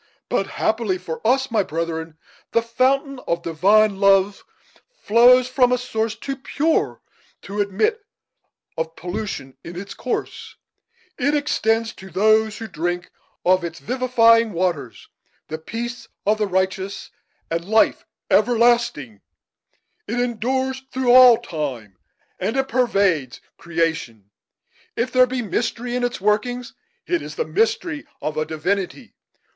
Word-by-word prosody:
But, - - 0
happily 220 -4 -1
for 160 -3 -7
us, 265 +1 +2
my 220 -2 +3
brethren, 160 -2 -4 0.4
the 230 - +3
fountain 260 +3 +1
of 170 0 -1
divine 195 +5 +3
love 195 0 +3 0.6
flows 245 +3 +5
from 255 -1 +3
a 250 - +3
source 225 -3 -2
too 270 +4 -5
pure 305 +4 -1 0.4
to 205 +1 -3
admit 415 - 0 0.7
of 160 0 -4
pollution 175 -7 -5
in 175 +1 -7
its 195 +1 -8
course; 255 - -5 0.6
it 285 +3 +2
extends, 225 -6 0
to 190 - -12
those 215 +4 +2
who 225 - -6
drink 175 0 -3 0.3
of 185 0 +4
its 170 -1 -5
vivifying 230 -3 +3
waters, 165 -8 -2 0.4
the 155 - -4
peace 235 +6 -6 0.2
of 215 +1 +2
the 210 - +1
righteous, 190 +1 -2 0.4
and 165 0 -1
life 220 +3 +3 0.3
everlasting; 235 - +2 0.9
it 235 +4 -2
endures 260 +3 -1
through 255 -1 +1
all 250 -2 +9
time, 140 - -5 0.4
and 225 - -1
it 270 0 +1
pervades 200 - +1 0.2
creation. 160 - -2 0.6
If 245 +2 -1
there 255 0 +5
be 250 -1 -3
mystery 240 +3 -2
in 250 - -1
its 245 0 -1
workings, 235 +5 -1 0.3
it 345 -1 0
is - - -8
the 475 - -1
mystery 430 -9 -1
of 155 - -3
a 155 - -1
Divinity. 185 - -3
220 Hz, 130 wpm, -21 LUFS, 175-250 Hz, 0.9 s, all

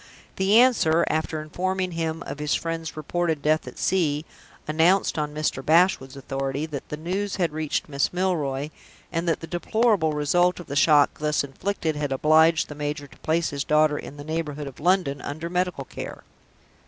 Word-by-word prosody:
The 195 +3 +4
answer 170 -10 +4
after 155 0 -1
informing 185 +3 -2
him 165 -1 -3
of 145 - -7
his 150 0 0
friend's 165 -2 -4
reported 160 0 -1
death 155 +1 +2
at - - -9
sea 155 -5 +1 0.4
announced 165 +3 +3
(on 150 -1 -2
Mr. 150 -3 -2
Bashwood's 160 -5 +3
authority) 135 +2 -3
that 150 -3 -7
the 150 - -4
news 190 +5 -2
had 175 -5 0
reached 155 -1 -2
Miss 140 -2 0
Milroy, 155 -6 -1 0.4
and 170 0 -1
that 165 - 0
the - - -5
deplorable 180 -1 +1
result 175 +5 +2
of 175 - -8
the 140 - -6
shock 145 0 +4
thus 150 -1 +1
inflicted 160 +3 -3
had 145 -2 -2
obliged 155 +4 +4
the - - -7
major 145 0 -4
to 140 - -18
place 165 +1 0
his 140 -1 -2
daughter 150 0 +3
in 145 - -9
the 145 - -8
neighborhood 150 -2 -3
of 135 -2 -9
London, 170 -4 +1
under 160 +4 -5
medical 180 -6 -1
care. - - -8
155 Hz, 180 wpm, -25 LUFS, 145-175 Hz, 0.4 s, The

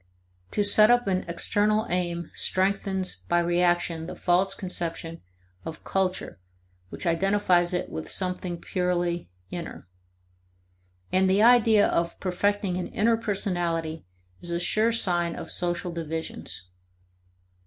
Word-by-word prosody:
To 205 - 0
set 215 +2 +7
up 245 0 +4
an 185 -2 0
external 210 +5 +1
aim 175 -2 -2
strengthens 190 0 0
by 175 - +3
reaction 175 -1 +1
the - - -7
false 180 +2 +1
conception 165 -3 -4 0.4
of 160 -1 -8
culture 190 - -2 0.5
which - - -7
identifies 175 0 +2
it 180 - -2
with 160 - -6
something 180 -2 -2
purely 175 - -1 0.2
"inner." 170 - -7 1.2
And 190 0 +3
the 195 +3 +4
idea 225 -3 +6
of 170 0 -1
perfecting 195 0 0
an 185 - -3
"inner" 230 +1 +2
personality 175 -7 -2 0.4
is 175 - -5
a 170 0 -1
sure 215 +5 +2
sign 175 -6 +1
of - - -6
social 175 0 -2
divisions. 160 - -5
180 Hz, 120 wpm, -26 LUFS, 170-200 Hz, 1.2 s, set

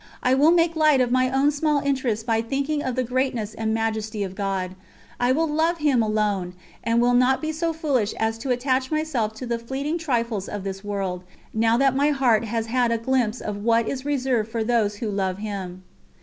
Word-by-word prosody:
I 255 - +3
will 285 +4 +5
make 335 -1 +3
light 305 -3 +4
of 245 -1 +1
my 255 0 +3
own 270 +2 +3
small 295 0 +1
interests 260 -6 -1
by 225 -1 +1
thinking 280 +5 -1
of 260 -3 -2
the 255 - +1
greatness 250 -4 -1
and 220 0 -2
majesty 220 -1 -1
of 190 -1 -5
God; 190 -2 -2 0.5
I 245 +1 +2
will 320 +5 +2
love 320 +3 +1
Him 290 -6 +2
alone, 210 -4 -1 0.3
and 230 +1 +2
will 245 +1 +3
not 250 +2 +4
be 315 0 -2
so 330 +2 -1
foolish 285 - 0
as 225 0 -1
to 260 - -5
attach 255 +1 0
myself 300 -9 -1
to 255 - -6
the 235 -1 -2
fleeting 275 +7 -3
trifles 235 - -1
of 205 -2 -5
this 195 0 -5
world, 195 -3 -3 0.3
now 225 +1 +3
that 270 0 +3
my 285 +2 +3
heart 245 -6 +2
has 225 0 -2
had 240 +1 +1
a 230 - +2
glimpse 240 -1 0
of 210 -1 -4
what 230 +2 +2
is 265 -1 -3
reserved 260 -6 0
for 225 0 -2
those 220 -3 +1
who 210 0 -3
love 190 -2 -1
Him." 195 -3 -6
240 Hz, 210 wpm, -24 LUFS, 215-275 Hz, 0.5 s, will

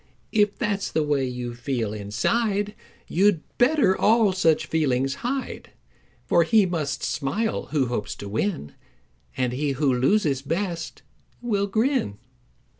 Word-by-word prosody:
If 210 -2 +2
that's 205 -4 -1
the 160 - +1
way 145 -3 0
you 125 -1 -5
feel 120 -3 -3
inside 200 - -1 0.3
You'd 185 -3 +2 0.2
better 250 -6 +4
all 215 -2 +3
such 165 -4 +2
feelings 135 -4 0
hide; 260 +2 -4 0.5
For 170 - +4
he 205 +5 +4
must 150 -6 -2
smile 205 +11 -1
who 145 -3 +1
hopes 105 -4 -3
to 100 - -8
win, 110 - -2 0.6
And 125 -1 0
he 140 +2 -1
who 135 0 +1
loses 135 +1 +2
best 170 +3 -3 0.4
will 205 -4 0
grin." 220 - 0
160 Hz, 130 wpm, -24 LUFS, 130-205 Hz, 0.6 s, better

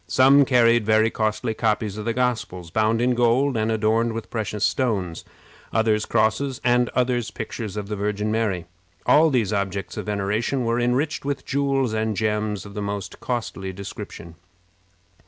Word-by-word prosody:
Some 135 +2 +5
carried 120 -3 +4
very 110 +1 +3
costly 110 +1 -1
copies 110 -2 0
of 105 - -6
the 115 - 0
Gospels, 110 -9 -2
bound 110 +3 +2
in 125 0 +3
gold 120 +3 +2
and 110 0 0
adorned 110 +1 +1
with 115 0 -6
precious 105 -2 -1
stones; 100 - -1 0.5
others 110 -1 +1
crosses, 115 +4 +1
and 125 0 +3
others 125 -2 +1
pictures 105 -4 -6
of 105 -1 -4
the 105 - -3
Virgin 105 +1 -1
Mary. 105 -6 -1 0.4
All 160 +2 +5
these 115 -7 +1
objects 100 -1 -3
of - - -5
veneration 105 +5 -1
were 115 +1 +1
enriched 125 +5 0
with 140 0 -3
jewels 135 -3 0
and 110 -1 -1
gems 105 -1 -1
of 100 - -10
the 105 - -4
most 100 -1 -5
costly 110 -6 -3
description. 100 -3 -8
110 Hz, 160 wpm, -23 LUFS, 105-120 Hz, 0.5 s, Some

